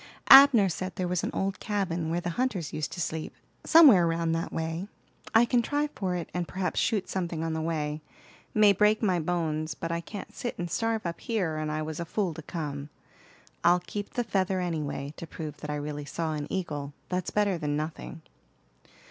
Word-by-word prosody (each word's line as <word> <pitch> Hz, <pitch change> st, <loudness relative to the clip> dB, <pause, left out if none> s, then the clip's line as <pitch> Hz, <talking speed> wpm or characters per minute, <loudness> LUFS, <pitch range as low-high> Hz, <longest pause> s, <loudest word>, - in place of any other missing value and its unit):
Abner 270 Hz, -7 st, +10 dB
said 185 Hz, +1 st, -4 dB
there 185 Hz, -, -2 dB
was 180 Hz, -1 st, -1 dB
an -, -, -1 dB
old 195 Hz, -1 st, -2 dB
cabin, 185 Hz, -7 st, -2 dB
where 170 Hz, +2 st, 0 dB
the 175 Hz, 0 st, -3 dB
hunters 195 Hz, -7 st, -2 dB
used 155 Hz, -, -3 dB
to -, -, -7 dB
sleep, 160 Hz, -1 st, -3 dB, 0.3 s
somewhere 270 Hz, -, +7 dB
round 165 Hz, 0 st, 0 dB
that 165 Hz, 0 st, -2 dB
way. 165 Hz, +3 st, -3 dB, 0.5 s
I 230 Hz, +2 st, +7 dB
can 240 Hz, 0 st, +2 dB
try 290 Hz, +5 st, -1 dB
for 185 Hz, -3 st, -2 dB
it, 170 Hz, -2 st, -4 dB
and 175 Hz, -1 st, -2 dB
perhaps 185 Hz, -1 st, -2 dB
shoot 210 Hz, -4 st, 0 dB
something 170 Hz, -4 st, -3 dB
on 165 Hz, -1 st, -2 dB
the 160 Hz, -, -2 dB
way. 155 Hz, -2 st, -2 dB, 0.5 s
May 210 Hz, -2 st, +5 dB
break 210 Hz, +3 st, +3 dB
my 185 Hz, -4 st, +2 dB
bones, 155 Hz, -2 st, -1 dB
but 165 Hz, -, -4 dB
I 170 Hz, 0 st, -1 dB
can't 200 Hz, +4 st, -8 dB
sit 240 Hz, -, -4 dB
and 175 Hz, -1 st, -4 dB
starve 225 Hz, -2 st, -1 dB
up 170 Hz, 0 st, -3 dB
here, 190 Hz, -9 st, -1 dB
and 155 Hz, 0 st, -2 dB
I 155 Hz, 0 st, -2 dB
was 155 Hz, +1 st, -5 dB
a 170 Hz, -, -3 dB
fool 185 Hz, 0 st, -1 dB
to 160 Hz, -, -8 dB
come. 150 Hz, -3 st, -5 dB, 0.7 s
I'll 175 Hz, +1 st, +5 dB
keep 205 Hz, +5 st, -6 dB
the 245 Hz, -, +1 dB
feather 190 Hz, -3 st, 0 dB
anyway, 150 Hz, -5 st, -3 dB
to 170 Hz, -, -7 dB
prove 150 Hz, -2 st, -7 dB
that 150 Hz, -, -8 dB
I 150 Hz, -, -1 dB
really 145 Hz, 0 st, -4 dB
saw 160 Hz, +1 st, -3 dB
an 150 Hz, -1 st, -4 dB
eagle; 145 Hz, -6 st, -3 dB, 0.2 s
that's 180 Hz, -1 st, -2 dB
better 200 Hz, -4 st, +1 dB
than 145 Hz, -1 st, -1 dB
nothing." 155 Hz, +1 st, -6 dB
170 Hz, 205 wpm, -28 LUFS, 155-195 Hz, 0.7 s, Abner